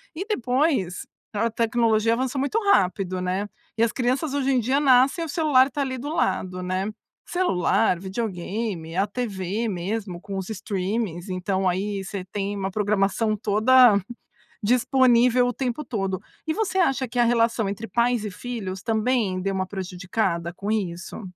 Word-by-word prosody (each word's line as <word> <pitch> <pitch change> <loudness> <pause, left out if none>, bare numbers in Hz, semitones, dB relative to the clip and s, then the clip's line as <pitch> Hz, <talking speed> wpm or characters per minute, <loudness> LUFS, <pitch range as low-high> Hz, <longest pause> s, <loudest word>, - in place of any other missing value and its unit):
E 380 +5 -4
depois 255 - 0 0.3
a 225 +2 0
tecnologia 230 -1 +2
avançou 260 +3 -1
muito 285 +12 +1
rápido, 185 - +1
né. 185 +3 -1 0.3
E 230 - +3
as 230 - +2
crianças 260 +4 -1
hoje 275 -1 0
em 255 - +3
dia 260 +5 +1
nascem 270 +3 +4
e - - -4
o - - -11
celular 285 -4 +4
está 285 +1 -3
ali 260 -2 -2
do 290 +4 -5
lado, 185 - -1
né. 185 +2 -1 0.4
Celular, 220 - +1
videogame, 190 -3 -4
a 200 +2 +2
TV 210 -1 -3
mesmo 190 0 -3
com 195 +1 -6
os 190 +2 -5
streamings, 200 -2 -3
então 185 +1 0
aí 195 +2 -2
você 190 -1 -6
tem 200 +1 -3
uma 190 0 -2
programação 210 +1 +1
toda 220 +2 +5 0.7
disponível 250 +1 +4
o 245 - -1
tempo 265 +3 -3
todo. 195 -5 -2 0.3
E 315 - +1
você 385 -3 0
acha 270 -6 +2
que 245 +1 -3
a - - +6
relação 230 -3 +2
entre 215 +3 -5
pais 235 -2 +1
e 205 - -4
filhos 195 -3 -5
também 220 -4 0
deu 195 0 -1
uma 190 -1 -1
prejudicada 180 -2 -2
com 205 +2 -3
isso? 185 -1 -3
215 Hz, 165 wpm, -24 LUFS, 190-250 Hz, 0.7 s, a